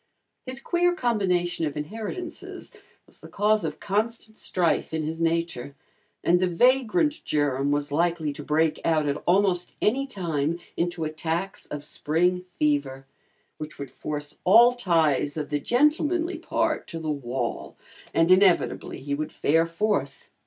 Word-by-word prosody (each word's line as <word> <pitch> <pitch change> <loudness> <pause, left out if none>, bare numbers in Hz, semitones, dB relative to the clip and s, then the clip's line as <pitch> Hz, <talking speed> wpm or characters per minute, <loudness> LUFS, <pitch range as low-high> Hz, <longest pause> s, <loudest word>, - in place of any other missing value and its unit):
His 260 +1 -2
queer 350 +4 +1
combination 180 - 0
of 150 - -5
inheritances 225 - -6 0.3
was - - -18
the - - -12
cause 210 0 +2
of 155 -2 -4
constant 220 +2 -2
strife 170 -4 0
in 160 - -1
his 160 +2 -4
nature, 165 -5 -1 0.5
and 175 +1 +4
the 185 - +2
vagrant 260 - +2
germ 145 -2 0
was 145 0 0
likely 165 -1 0
to 145 - -8
break 155 +1 +1
out 155 -2 +2
at 145 +1 -1
almost 180 -1 +2
any 270 +6 +1
time 170 - -2 0.2
into 175 -1 -1
attacks 160 +4 -3
of 145 -1 -6
"spring 180 +5 0
fever," 140 -3 0 0.5
which 155 0 -7
would 140 -2 -7
force 150 +1 -5
all 235 +6 +7
ties 160 - +1
of 150 -1 -4
the 145 - +1
gentlemanly 310 - +1
part 330 -1 -1
to 165 - -6
the 160 -1 -2
wall 135 -3 -4 0.4
and 165 +2 +3
inevitably 185 -1 +3
he 140 +1 -3
would 155 +2 -3
fare 165 +3 +2
forth. 205 +6 -2
170 Hz, 145 wpm, -25 LUFS, 150-215 Hz, 0.5 s, all